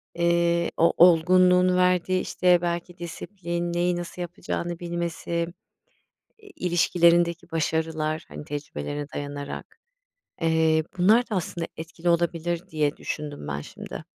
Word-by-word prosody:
eee, 170 0 +2
o 165 - +4
olgunluğun 180 +1 +5
verdiği 180 0 +2
işte 180 -1 +2
belki 175 0 -3
disiplin, 175 0 -4
neyi 175 +1 +1
nasıl 175 +1 -6
yapacağını 175 0 -4
bilmesi, 170 -1 -3 0.9
i 430 - -18
ilişkilerindeki 170 - +2
başarılar, 160 -1 -1
hani - - -8
tecrübelerine 145 - -5
dayanarak. 145 0 -6 0.7
Eee, 160 -1 +3
bunlar 215 +7 +4
da 215 - -1
aslında 170 -2 -3
etkili 165 +2 -4
olabilir 170 0 0
diye 150 -2 0
düşündüm 145 - -5
ben 75 0 -3
şimdi. - - -9
170 Hz, 115 wpm, -25 LUFS, 160-175 Hz, 0.9 s, olgunluğun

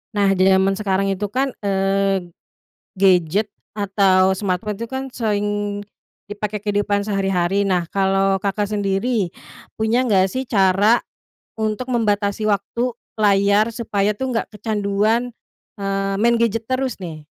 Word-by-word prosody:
Nah, 200 -1 +3
di 185 0 +3
jaman 190 0 +4
sekarang 195 -1 0
itu 195 +2 -2
kan, 260 +6 -1
eee, 195 -1 +1 0.8
gadget 190 +1 +3 0.3
atau 190 -2 +3
smartphone 200 +2 -2
tuh 230 0 -6
kan 265 0 -3
sering 205 -2 -1 0.5
dipakai 210 0 -4
kehidupan 205 -1 0
sehari-hari. 195 -2 +1
Nah, 180 -2 +1
kalau 195 0 +2
Kakak 205 +1 0
sendiri 205 0 0 0.5
punya 220 +3 +2
nggak 200 -7 +3
sih 260 - -2
cara 200 +3 +4 0.6
untuk 220 +3 -2
membatasi 210 -3 0
waktu 225 +4 -1 0.3
layar 205 +1 +3
supaya 210 -3 0
tuh 260 +5 -3
nggak 225 - -1
kecanduan, 215 +3 0 0.5
eee, 195 0 -1
main 235 +1 +4
gadget 230 -1 0
terus 255 -2 -1
nih? 155 -3 -7
205 Hz, 130 wpm, -20 LUFS, 195-220 Hz, 0.8 s, jaman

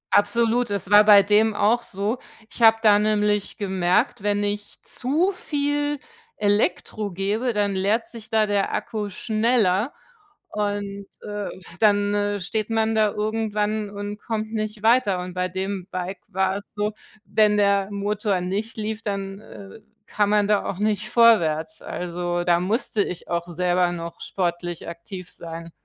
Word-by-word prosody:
Absolut, 235 +3 +2
es 200 -1 -3
war 210 +1 +9
bei 205 -1 +8
dem 210 +2 +3
auch 220 +4 +3
so. 210 +2 -3 0.3
Ich - - -11
habe 225 0 +7
da 205 -1 +6
nämlich 210 -1 +1
gemerkt, 190 +3 +1
wenn 205 0 0
ich 205 0 -4
zu 305 +10 0
viel 290 -4 -1 0.4
Elektro 205 0 0
gebe, 205 +7 -1
dann 205 -1 +1
leert 200 +4 +1
sich 225 -2 -11
da 220 -1 +3
der 205 -1 0
Akku 215 -3 -3
schneller 220 +1 +1 0.6
und, 205 -1 -3 0.2
äh, 205 -1 -4 0.3
dann, 205 -1 +3
äh, 205 0 0
steht 215 +4 -2
man 225 0 +1
da 215 -1 +3
irgendwann 215 0 -1
und 205 +1 -6
kommt 220 -1 -3
nicht 215 -1 -3
weiter. 225 -5 +3
Und 180 0 -6
bei 180 0 -1
dem 190 0 -4
Bike 185 +1 -5
war 190 +1 0
es 200 - -8
so, 210 +1 -1 0.3
wenn 210 -1 +3
der 200 -1 +3
Motor 205 -1 -1
nicht 200 +6 -3
lief, 215 0 -3
dann, 195 -2 -4
äh, 200 0 -12 0.3
kann 205 -1 0
man 210 -1 +3
da 210 -1 +2
auch 185 - -3
nicht 210 0 -1
vorwärts, 165 -9 +3
also 175 0 -3
da 175 -1 +3
musste 210 +3 0
ich 180 -2 -7
auch 170 0 -2
selber 180 +1 +1
noch 170 -1 -7
sportlich 175 -2 -3
aktiv 175 +2 -8
sein, 165 0 -8
205 Hz, 155 wpm, -23 LUFS, 190-215 Hz, 0.6 s, war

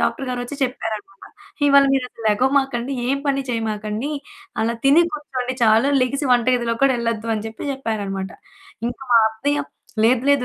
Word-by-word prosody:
Doctor 275 - -1
గారు 250 -1 -2
ఒచ్చి 275 +4 -7
చెప్పారనమాట, 220 -6 -4 0.4
"ఇవాళ 280 0 +6
మీరసలు 250 -4 -2
లెగవమాకండి, 265 +2 +1 0.2
ఏం 275 +1 +1
పని 275 -1 +1
చేయమాకండి. 220 +3 -2 0.5
అలా 230 +1 0
తిని 285 +5 +6
కూర్చోండి 260 -4 -4
చాలు. 225 +4 +4
లెగిసి 275 +3 0
వంట 240 -1 +3
గదిలోకి 230 -1 -2
కూడా 270 -2 +5
ఎళ్లొద్దు" 230 -1 -2
అని 215 0 -4
చెప్పి 225 +6 -5
చెప్పారన్నమాట. 200 -7 -3 0.6
ఇంక 245 - -6
మా 235 - +8
అత్తయ్య 285 +7 -1 0.4
"లేదు 245 +1 +3
లేదు, 275 -3 +3
245 Hz, 155 wpm, -21 LUFS, 225-275 Hz, 0.6 s, మా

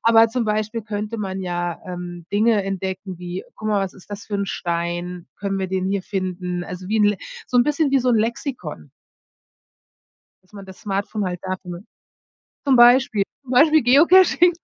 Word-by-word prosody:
Aber 225 0 +6
zum 240 +1 -1
Beispiel 215 +1 -1
könnte 215 +1 -4
man 190 -2 -4
ja, 175 -2 -3
ähm, 175 -1 -7
Dinge 215 0 +3
entdecken 190 -1 -4
wie: 180 +1 -6
„Guck 215 - -4
mal, 205 -2 +2
was 190 - -4
ist 190 - -17
das 205 0 -7
für 210 - -5
'n 200 0 -2
Stein? 175 0 -3
Können 195 -1 -3
wir 190 - -1
den 185 0 -1
hier 195 -1 -1
finden?“ 180 -2 -3
Also 180 +1 -8
wie 220 - +1
'n 210 - +4
Le 205 0 +3 0.3
so 250 - -1
'n 240 - +5
bisschen 295 0 +1
wie 275 - +4
so 250 0 +1
'n 235 - +4
Lexikon 215 - -4 1.5
dass 185 - -31
man 200 -1 -10
das 190 -1 -13
Smartphone 200 +1 -2
halt 180 -1 -3
dafür 185 -1 -5 0.8
zum 270 - +4
Beispiel 240 -3 +6 0.2
zum 255 - -9
Beispiel 305 +4 +5
Geocaching, 345 +7 +6
200 Hz, 185 wpm, -22 LUFS, 180-230 Hz, 1.5 s, Aber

